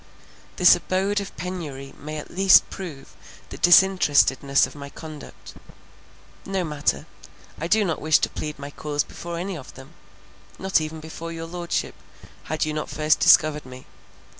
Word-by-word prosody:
This 180 -2 +7
abode 195 +3 -1
of 200 - -9
penury 150 -7 -6
may 155 +1 -7
at 150 - -8
least 190 +1 +6
prove 160 -8 -9 0.3
the - - -8
disinterestedness 150 -7 +4
of - - -11
my 140 -1 -9
conduct. 155 0 -11 0.9
No 195 -1 -2
matter: 150 -3 -1 0.5
I 165 - -3
do 210 +3 +3
not 165 -4 -2
wish 155 0 +4
to - - -1
plead 150 0 -6
my 140 0 -8
cause 145 0 -2
before 170 0 -8
any 185 +2 -4
of 140 -6 -11
them, 130 +3 -13 0.7
not 190 -3 +1
even 155 0 -6
before 160 +1 -8
your 165 0 -6
Lordship, 170 +1 -3 0.5
had 155 0 -1
you 155 - -3
not 155 0 -4
first 155 +1 +1
discovered 150 -1 +5
me. 130 0 -12
155 Hz, 160 wpm, -23 LUFS, 145-180 Hz, 0.9 s, This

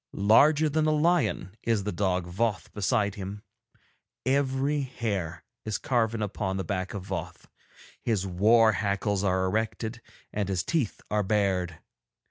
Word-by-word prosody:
Larger 145 +10 +5
than 155 +1 +1
a - - +3
lion 150 - +1
is 115 -4 0
the 105 - -2
dog 95 -4 0
Voth 105 +5 -2
beside 105 0 +1
him; 100 +1 -7 0.8
every 135 +2 +1
hair 100 - -3 0.2
is 110 -2 -2
carven 115 -4 0
upon 95 -2 -2
the 95 - -2
back 95 +2 -3
of 95 -2 -5
Voth, 90 -2 -5 0.6
his 105 -5 0
war 110 +5 +5
hackles 100 -1 0
are 95 -1 +2
erected 110 +3 -2 0.3
and 100 -2 -1
his 95 -3 0
teeth 155 -11 -1
are 105 0 +2
bared. 95 -4 0
105 Hz, 140 wpm, -27 LUFS, 95-120 Hz, 0.8 s, Larger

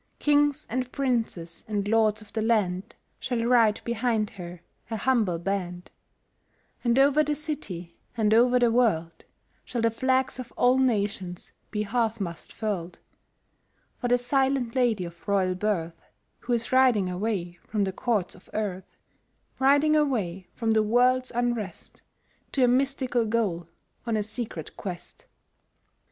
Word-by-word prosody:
Kings 290 -1 +2
and 255 +1 -3
Princes 225 - -2
and 205 -2 -2
Lords 215 0 +2
of 210 - -19
the 220 - -1
land 205 -5 0 0.2
Shall 240 -3 -1
ride 230 -3 +4
behind 230 -2 0
her, 175 -3 -9 0.3
a 225 - -2
humble 215 -7 +1
band; 180 0 -4 0.9
And 240 0 +2
over 285 +2 +5
the 300 0 -1
city 200 - -6 0.2
and 215 -1 +3
over 245 +2 +5
the 240 -2 +3
world 170 -9 +1 0.4
Shall 235 -2 -3
the 230 - +3
Flags 260 +2 0
of 245 -2 -7
all 250 +1 +4
Nations 200 -7 -1 0.2
be 210 -1 -2
half 225 +1 0
mast 170 -4 -6
furled, 195 -6 -4 1.0
For 245 - -1
the 245 0 +4
silent 265 -1 +1
lady 235 -8 +1
of 170 +2 -12
royal 190 -2 +2
birth 180 -4 -2 0.4
Who 245 - -2
is 230 -1 -1
riding 255 -7 +4
away 180 -2 -3
from 210 -2 0
the 190 -1 -2
Courts 210 -4 -1
of 180 - -16
earth, 195 -3 -4 0.6
Riding 285 +3 +4
away 210 - 0
from 225 -2 0
the 220 0 +4
world's 250 +4 +3
unrest 235 -6 -3 0.5
To 265 - +2
a - - +6
mystical 255 -2 +1
goal, 200 -7 -1 0.4
on 225 -2 +1
a 210 - 0
secret 210 -7 -6
quest. 175 -2 -8
225 Hz, 145 wpm, -26 LUFS, 190-250 Hz, 1.0 s, a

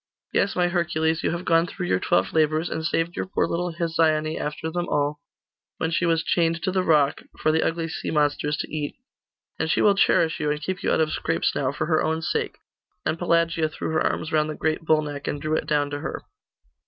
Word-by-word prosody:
'Yes, 200 - +1
my 180 -1 +3
Hercules, 160 -2 0
you - - 0
have 170 +2 -3
gone 165 0 +3
through - - -5
your 95 +1 +1
twelve 95 +1 +1
labours, 155 +1 +2
and 160 - -3
saved 165 +1 0
your - - -3
poor 190 - +1
little 175 +1 -2
Hesione 160 -2 +1
after 150 +2 -4
them 175 +1 -2
all, 145 0 0 0.6
when 160 - -1
she 170 +2 +1
was 165 -1 +2
chained 165 -1 +1
to 185 - +1
the 185 0 +1
rock, 150 -5 +3 0.2
for 155 - +2
the 160 +1 +2
ugly 165 0 -1
sea 160 - -4
monsters 150 -1 +1
to - - -5
eat; 145 -2 -3 0.6
and - - 0
she - - +2
will 205 - +6
cherish 165 -4 +3
you, 150 - 0
and 150 0 -1
keep 185 +3 -3
you - - 0
out - - +3
of 155 -1 +1
scrapes 165 - 0
now, 130 -2 0
for 155 - -2
her 155 -1 +2
own 160 +1 -1
sake;' - - -2 0.5
and 165 - -1
Pelagia 170 -2 +2
threw 155 - -4
her 160 - +1
arms 155 - -1
round 155 0 +2
the 155 - -4
great 160 +1 -1
bull 155 -1 +3
neck, 145 -1 -6
and 145 - -2
drew 155 +2 -1
it - - -2
down 145 -1 +1
to 145 - -3
her. - - -5
160 Hz, 230 wpm, -24 LUFS, 150-165 Hz, 0.6 s, will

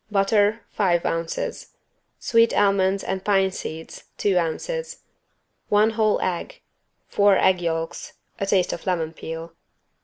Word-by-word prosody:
Butter, 205 +2 +2
five 175 -5 +1
ounces. 165 0 -3 0.4
Sweet 230 -1 +3
almonds 195 -1 +2
and 190 0 -3
pine 195 -2 +2
seeds, 160 -3 -8
two 200 -2 +1
ounces. 485 - -4 0.7
One 210 +2 +4
whole 215 -1 +2
egg. 185 - -3 0.5
Four 200 -1 +4
egg 185 -1 +3
yolks. 165 0 -3 0.3
A 195 - -2
taste 185 -2 +2
of 170 - -8
lemon 165 -3 -1
peel. 165 +1 -7
190 Hz, 125 wpm, -23 LUFS, 170-205 Hz, 0.7 s, One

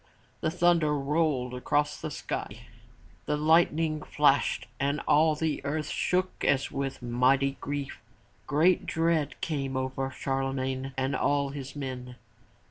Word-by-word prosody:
The - - 0
thunder 170 -3 +3
rolled 140 -3 0
across 145 +4 0
the - - -3
sky, - - -5 0.7
the 150 - +1
lightning 160 0 +3
flashed 145 -2 +2
and 140 +2 0
all 155 +1 +4
the 155 -1 -2
earth 150 +2 -2
shook 185 +1 -1
as 135 -1 +2
with 135 -2 -4
mighty 130 +3 +2
grief. 145 -1 -4 0.5
Great 160 +5 +3
dread 165 -3 0
came 135 -4 -2
over 130 0 -2
Charlemagne 135 0 -2
and 135 +1 0
all 140 -1 +1
his 135 0 -7
men. 130 -3 -6
140 Hz, 130 wpm, -28 LUFS, 135-155 Hz, 0.7 s, all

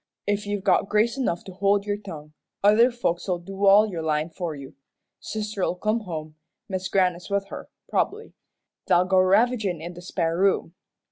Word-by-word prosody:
"If 205 0 -1
you've 205 -1 -2
got 195 0 +2
grace 220 +3 +2
enough 240 -11 -1
to 190 - -10
hold 200 +2 +1
your 205 -1 -1
tongue, 155 -7 -10 0.3
other 215 +4 +6
folks'll 185 -6 -1
do 195 +3 -2
all 205 +2 +7
your 175 -6 -4
lyin' 155 +1 -1
for 165 -2 -4
you. 135 -1 -10 0.5
Sister'll 210 -4 -3
come 215 +5 0
home, 155 -6 -7 0.3
Mis' 190 -2 -3
Grannis 180 -2 +1
with 200 0 -1
her, - - -8 0.2
prob'bly. 445 +2 -2 0.5
They'll 180 +1 +4
go 190 0 +3
ravagin' 200 -1 +2
in 170 +3 -7
the 175 - -11
spare 170 -2 -1
room. 190 -3 +1
195 Hz, 175 wpm, -25 LUFS, 175-210 Hz, 0.5 s, all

